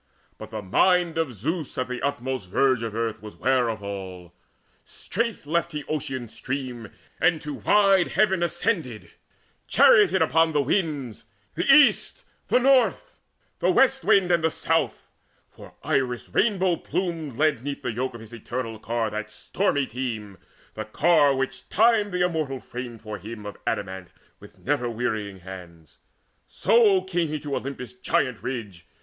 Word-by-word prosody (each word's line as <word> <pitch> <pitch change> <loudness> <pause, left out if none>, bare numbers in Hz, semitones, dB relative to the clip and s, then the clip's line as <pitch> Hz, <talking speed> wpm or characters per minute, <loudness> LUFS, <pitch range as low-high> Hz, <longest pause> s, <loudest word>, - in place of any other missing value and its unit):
But 110 - -8
the 110 -2 -6
mind 175 - +2
of 160 -5 0
Zeus, 150 - -4
At 130 - -1
the 125 0 -5
utmost 130 -7 -3
verge 130 +4 +2
of 115 -2 -4
earth, 115 -2 -2
was 105 -1 -10
ware 130 -2 +2
of 110 -2 -5
all: 95 -3 -7 0.5
Straight 230 -4 -4
left 170 +2 -1
he 150 -1 -4
Ocean's 130 -6 -4
stream, 125 -5 -5 0.3
and 175 -3 +3
to 150 -1 -5
wide 195 -1 +3
heaven 190 -2 +2
Ascended, 170 - -2 0.6
charioted 410 - +5
upon 160 +1 +2
the 145 - +3
winds, 145 - -2 0.3
The 175 - +2
East, 290 0 +4 0.2
the - - +3
North, 265 - +2 0.4
the - - +2
West 265 0 +3
wind, 195 -4 +4
and 170 -2 +2
the 160 - +3
South: - - -1 0.4
For - - -14
Iris 125 -3 -1
rainbow 190 -6 +2
plumed 165 -8 -3
led 145 -3 +1
'neath 140 0 -5
the 125 - -1
yoke 125 +2 -3
Of 115 - -9
his 115 +1 -12
eternal 115 -1 -5
ear 115 -2 0
that 110 0 -4
stormy 145 - -1
team, 110 -6 -5 0.3
The - - -6 0.2
ear 155 -5 +5
which 130 -2 -4
Time 220 -1 +3
the 180 -1 +1
immortal 155 -6 -2
framed 120 -3 -8
for 110 -1 -6
him 105 +2 -9
Of 105 - -6
adamant 95 -1 -3 0.3
with - - -15
never 125 -2 -1
wearying 110 -5 -3
hands. 85 -4 -12 0.5
So 210 -5 +3
came 175 -3 -1
he 155 0 -3
to 145 -2 -3
Olympus' 130 -2 -6
giant 125 -1 -1
ridge. 105 -10 -6
135 Hz, 155 wpm, -25 LUFS, 115-175 Hz, 0.6 s, charioted